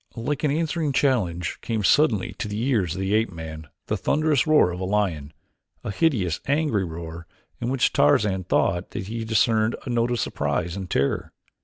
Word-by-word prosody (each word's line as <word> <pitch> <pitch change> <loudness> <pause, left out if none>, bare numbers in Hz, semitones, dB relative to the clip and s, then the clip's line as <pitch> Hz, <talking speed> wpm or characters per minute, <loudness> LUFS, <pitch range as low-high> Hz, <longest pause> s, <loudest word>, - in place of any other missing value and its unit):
Like 130 +6 -3
an 150 - +3
answering 155 0 -1
challenge 90 - 0
came 110 -2 -2
suddenly 115 -4 +3
to - - -2
the 105 +1 -4
ears 110 - 0
of 95 - -4
the 95 +1 0
ape 110 -1 +2
man 80 -2 -8 0.2
the - - -1
thunderous 155 -1 +1
roar 155 -12 +5
of 90 - -6
a - - -3
lion, 90 -8 -1 0.5
a - - -3
hideous 100 - +1
angry 140 -8 +1
roar 85 -1 -7 0.3
in 120 - -2
which 130 -2 +1
Tarzan 95 -3 +3
thought 90 +2 +1
that 95 - -5
he 115 0 -3
discerned 110 0 +2
a 125 - -3
note 120 0 +1
of 120 -1 -1
surprise 85 +1 -1
and 95 -2 -6
terror. 70 -4 -1
105 Hz, 185 wpm, -24 LUFS, 90-130 Hz, 0.5 s, roar